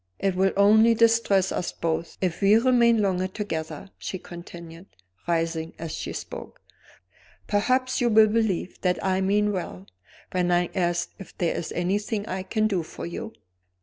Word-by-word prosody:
It 195 -1 0
will 190 +1 +2
only 220 +3 +6
distress 225 -4 +3
us 175 - -2
both 165 0 -3
if 180 -1 -1
we 200 +2 +6
remain 235 -2 +4
longer 185 -1 0
together," 165 -3 -5
she 185 - -4
continued, 170 0 -11 0.4
rising 165 -1 -1
as 165 -1 -6
she - - -5
spoke. - - -8 0.9
"Perhaps 255 +5 +1
you 240 - +3
will 220 -1 +7
believe 215 -5 -1
that 180 -1 +1
I 190 0 +1
mean 205 +2 +2
well, 135 - -5 0.5
when 180 -1 0
I 175 0 +2
ask 175 -2 0
if 195 - -12
there 170 -2 0
is 165 - -4
anything 205 +4 -1
I 185 0 -3
can 215 +3 -1
do 190 -5 0
for 160 - -8
you?" 195 +6 -6
190 Hz, 160 wpm, -25 LUFS, 175-215 Hz, 0.9 s, will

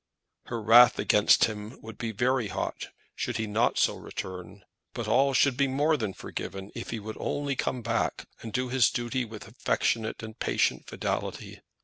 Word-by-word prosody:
Her 120 - -3
wrath 115 +2 +7
against 105 0 +5
him 105 +1 -6
would 110 0 -10
be 115 -2 -2
very 120 +2 +1
hot - - -4 0.3
should - - -3
he 110 - -1
not 110 +2 +1
so - - +3
return; 90 +1 -8 0.3
but 115 - -4
all 135 +5 +4
should 140 -1 +4
be 140 +2 +2
more 145 +4 +2
than 110 -9 -3
forgiven 95 +1 -6
if 115 - -6
he 115 - -3
would 110 +1 -7
only 145 -1 -2
come 125 -2 -2
back, 115 0 -1 0.2
and 115 - -7
do 125 +2 -1
his 125 -2 +4
duty 120 +1 -2
with 110 -1 -10
affectionate 110 -1 -1
and 110 +1 -9
patient - - 0
fidelity. - - -4
115 Hz, 175 wpm, -28 LUFS, 110-125 Hz, 0.3 s, wrath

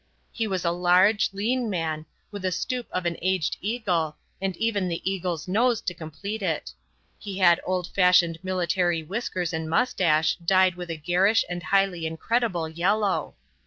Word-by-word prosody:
He 225 -2 -2
was 190 -3 -2
a 170 - +3
large, 180 +4 +4
lean 230 +4 -1
man, 160 -4 -3 0.2
with 205 -1 -6
the 185 0 -1
stoop 245 +8 -3
of 185 -1 -2
an 170 -1 -1
aged 185 -3 0
eagle, 180 -8 -1 0.2
and 190 -2 -2
even 210 -4 0
the 170 +1 -4
eagle's 180 -4 -2
nose 230 +4 +2
to 180 - -3
complete 170 +6 -6
it; 160 - -2 0.5
he 200 -2 -6
had 175 -3 +5
old 185 -1 0
fashioned 180 -3 +4
military 175 -2 0
whiskers 180 -2 -3
and 160 0 -3
moustache 160 -6 +2
dyed 185 +1 +3
with 175 0 -8
a 165 - -3
garish 180 +8 +2
and 175 0 -4
highly 185 -3 +1
incredible 175 +1 -1
yellow. 190 +5 0
180 Hz, 160 wpm, -25 LUFS, 170-200 Hz, 0.5 s, had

